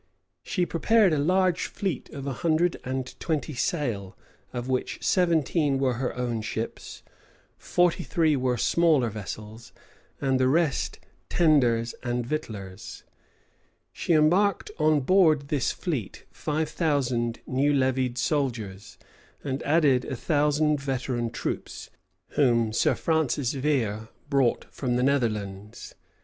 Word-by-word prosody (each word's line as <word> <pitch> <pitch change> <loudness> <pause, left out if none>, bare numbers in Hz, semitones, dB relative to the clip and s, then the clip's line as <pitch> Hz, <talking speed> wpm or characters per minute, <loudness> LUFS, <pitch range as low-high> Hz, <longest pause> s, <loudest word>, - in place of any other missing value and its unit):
She 180 - -1
prepared 195 +3 +3
a 150 - +1
large 185 +3 +2
fleet 190 -9 -4
of 140 -2 -7
a 140 - -2
hundred 165 +5 +1
and 130 0 -4
twenty 155 -1 -2
sail, 120 - -2 0.3
of 125 0 -5
which 130 -1 -1
seventeen 160 -5 +2
were 135 -2 +1
her 125 - -2
own 120 -2 -2
ships, 110 +1 -5 0.5
forty 175 0 +1
three 160 -3 +2
were 125 -2 0
smaller 155 -6 +3
vessels, 110 +2 -8 0.5
and 135 -2 +1
the 130 - +3
rest 155 +2 +1 0.3
tenders 125 -9 +3
and 120 -1 -2
victuallers: 105 -9 -6 0.9
she 170 - 0
embarked 175 +6 +3
on 155 -1 +3
board 155 -3 +3
this 145 -5 +1
fleet 140 - -4
five 155 +1 -2
thousand 125 -7 0
new 140 +3 +1
levied 130 -2 +1
soldiers, 120 -8 -2 0.5
and 135 -1 -3
added 145 -4 +3
a 130 - -4
thousand 150 +2 +1
veteran 130 -3 -2
troops, 120 - -5 0.4
whom 115 -6 +2
Sir - - +2
Francis 155 -5 0
Vere 120 -7 -1 0.2
brought 135 -4 +2
from 125 -3 -2
the 125 - +1
Netherlands. 105 -7 -2
135 Hz, 125 wpm, -26 LUFS, 120-155 Hz, 0.9 s, prepared